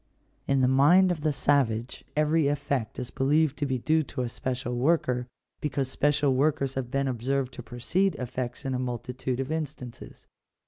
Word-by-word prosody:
In 135 -1 +3
the 130 - +4
mind 160 +8 +5
of 165 -4 -3
the 155 0 +2
savage 130 -4 +1
every 150 0 +3
effect 140 -5 -1
is 125 -1 -5
believed 145 +2 +2
to 145 - 0
be 130 -1 0
due 155 +6 +2
to 140 -3 -4
a 120 - -2
special 125 0 -3
worker, 125 -2 +1 0.3
because 140 -3 -2
special 145 -1 +2
workers 140 0 +1
have 130 -3 -3
been 135 +1 0
observed 130 +2 -1
to - - -7
precede 155 +10 0
effects 125 +1 -5
in 135 - -1
a 125 - -1
multitude 125 +1 -3
of 135 +2 -3
instances. 150 -6 -6
135 Hz, 175 wpm, -27 LUFS, 125-150 Hz, 0.3 s, mind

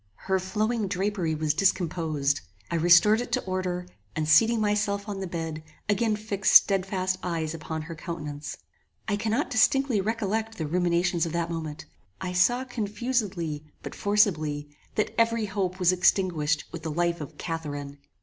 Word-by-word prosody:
Her 190 0 +2
flowing 215 +3 -1
drapery 190 -3 -1
was 155 -1 0
discomposed. 160 -5 +1 0.3
I - - 0
restored 175 +7 +6
it 245 - -6
to - - +1
order, 185 -1 -2 0.3
and 155 -1 -1
seating 225 +9 +5
myself 205 -1 0
on 200 -2 -4
the 190 - -3
bed, 165 -2 -4 0.3
again 210 +2 +2
fixed 210 -1 0
stedfast 190 -1 +4
eyes 165 -3 -2
upon 160 -1 -5
her 165 +1 -7
countenance. 155 -3 -6 0.5
I 210 - +1
cannot 225 +6 -1
distinctly 245 -1 +3
recollect 220 +1 -2
the 160 - -2
ruminations 175 +1 +1
of 165 - -5
that 170 0 -1
moment. 160 -3 -5 0.3
I 180 -1 -4
saw 240 +8 +3
confusedly, 210 - -2 0.2
but - - -6
forcibly, 155 -8 +1 0.2
that 215 - 0
every 230 -1 +2
hope 190 -2 -2
was 180 -1 +5
extinguished 175 -5 +2
with 170 - -6
the 160 - -4
life 170 +1 0
of 150 - -8
CATHARINE. 145 -4 -5
185 Hz, 155 wpm, -27 LUFS, 160-210 Hz, 0.5 s, restored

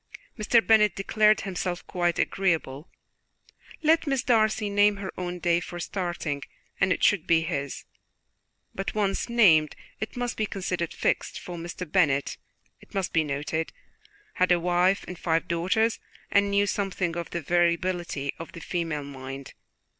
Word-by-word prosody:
Mr. 225 +1 +3
Bennet 210 -4 +5
declared 215 +2 +3
himself 180 -2 -3
quite 175 -1 0
agreeable; 165 -6 -1 0.9
let 320 +1 +3
Miss 270 -2 +1
Darcy 220 -3 +2
name 205 0 +3
her 195 -1 -5
own 180 -1 -4
day 170 -1 +2
for 175 0 -7
starting, 175 -5 -3 0.4
and 195 -1 +3
it - - 0
should 200 -6 +3
be 165 -1 +4
his; 140 -5 -4 0.9
but 195 +2 -4
once 205 +1 0
named, 170 -11 +5 0.2
it 215 - -5
must 245 0 -2
be 215 - 0
considered 180 -4 -3
fixed, - - -1
for 175 - -8
Mr. 170 +2 -6
Bennet, 150 -5 +1 0.4
it - - -17
must 195 -2 -1
be 165 - +3
noted, 150 +2 -2 0.6
had 185 0 +2
a 175 - +5
wife 180 +3 +2
and 180 -1 -7
five 165 -1 0
daughters, 190 +7 +1 0.3
and 200 0 +4
knew 200 0 +3
something 190 -4 -1
of 170 -1 -4
the 170 - -3
variability 170 -3 0
of 165 - -8
the - - -8
female 165 -3 -3
mind. 135 -1 -8
180 Hz, 155 wpm, -26 LUFS, 165-200 Hz, 0.9 s, Bennet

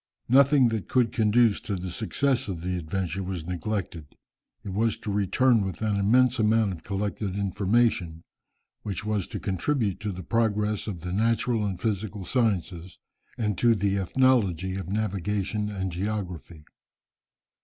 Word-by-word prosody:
Nothing 135 0 +5
that 110 -3 -3
could 125 -3 +2
conduce 110 0 +3
to 100 - -3
the 90 0 -5
success 130 +5 0
of 90 -5 -4
the 90 +1 -2
adventure 90 +2 -3
was 90 -3 -4
neglected. 90 -3 -4 0.6
It 100 - -6
was 115 +3 +1
to 110 -2 -5
return 110 +4 +3
with 95 +2 -4
an 105 -2 +1
immense 115 +6 +3
amount 110 -2 +3
of 80 - -10
collected 100 0 -3
information, 100 -4 +1 0.6
which 100 -1 -5
was 105 -4 -1
to - - -5
contribute 100 +2 -1
to 105 -1 -3
the 95 0 -7
progress 105 0 0
of 90 -6 -5
the 90 +1 -4
natural 115 +2 +1
and 95 -3 -3
physical 105 -2 -3
sciences, 95 -7 -1 0.4
and 105 -3 0
to 120 -1 +4
the 100 -1 0
ethnology 95 -4 +2
of 95 -2 -5
navigation 105 0 -1
and 95 -2 -3
geography. 90 -4 -5
100 Hz, 150 wpm, -26 LUFS, 95-110 Hz, 0.6 s, Nothing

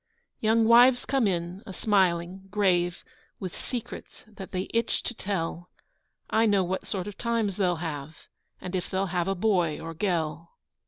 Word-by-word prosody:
Young 225 +1 +3
wives 245 +2 +6
come 265 -5 +2
in, 175 0 -2
a 190 - -7
smiling, 190 -2 +1
grave, 180 -4 +1 0.4
With 185 -3 -5
secrets 245 -3 -7
that 205 -3 -10
they 185 0 -2
itch 230 0 +1
to - - -3
tell: 175 -4 -3 0.6
I 225 +1 +3
know 200 -2 +3
what 185 +1 -3
sort 190 -3 -2
of 205 - -8
times 230 -5 0
they'll 180 -3 +2
have, 160 -2 -6 0.3
And 185 +1 -5
if 180 - -2
they'll 190 +1 0
have 175 0 0
a 195 - 0
boy 180 -6 +1
or 165 0 -6
gell. 165 -3 -2
190 Hz, 165 wpm, -27 LUFS, 175-215 Hz, 0.6 s, wives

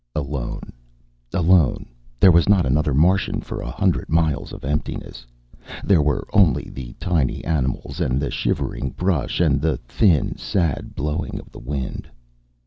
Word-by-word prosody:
Alone, 70 -4 -4 0.7
alone. 85 -5 +3 0.3
There 95 - +8
was 85 +2 +4
not 100 -4 +4
another 75 +3 +1
Martian 85 +7 +2
for - - -6
a - - -5
hundred - - 0
miles 80 -4 +1
of - - -9
emptiness. 65 -4 -4 0.6
There 95 -6 +4
were 75 -1 0
only 100 -7 +3
the 65 -2 -8
tiny 80 -9 0
animals 70 0 -2
and 65 -5 +1
the 70 - -2
shivering 65 - -2
brush 85 -9 0
and 75 -5 +3
the 80 -4 +1
thin, 75 - +1
sad 85 -7 -1
blowing 75 +2 -3
of - - -14
the - - -11
wind. 65 0 -5
75 Hz, 145 wpm, -22 LUFS, 65-85 Hz, 0.7 s, There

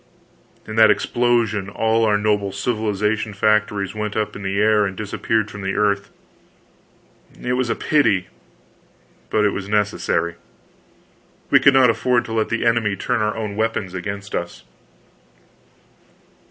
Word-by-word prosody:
In 110 0 -7
that 110 -1 +7
explosion 110 -1 +1
all 110 +2 +1
our 105 -1 +3
noble 105 -1 0
civilization 105 0 -1
factories 105 -2 +1
went 105 0 -4
up 105 -1 -2
in - - -8
the 95 0 -2
air 105 0 +4
and 95 -2 -3
disappeared 110 +1 -1
from 100 - -8
the 95 0 -3
earth. 100 -1 0 1.3
It 125 - -2
was 125 -1 0
a - - 0
pity, 110 -12 +2 1.0
but 105 -1 +2
it 105 - +1
was 95 0 -5
necessary. 105 -5 0 1.1
We - - +7
could 140 - +5
not 130 -3 +6
afford 120 +1 +1
to 115 - -6
let 110 -1 0
the 115 - -1
enemy 115 -3 +2
turn 125 +2 -1
our 105 0 -1
own 105 -2 -4
weapons 110 -4 -2
against 100 +2 -6
us. - - -4
105 Hz, 145 wpm, -21 LUFS, 100-115 Hz, 1.3 s, that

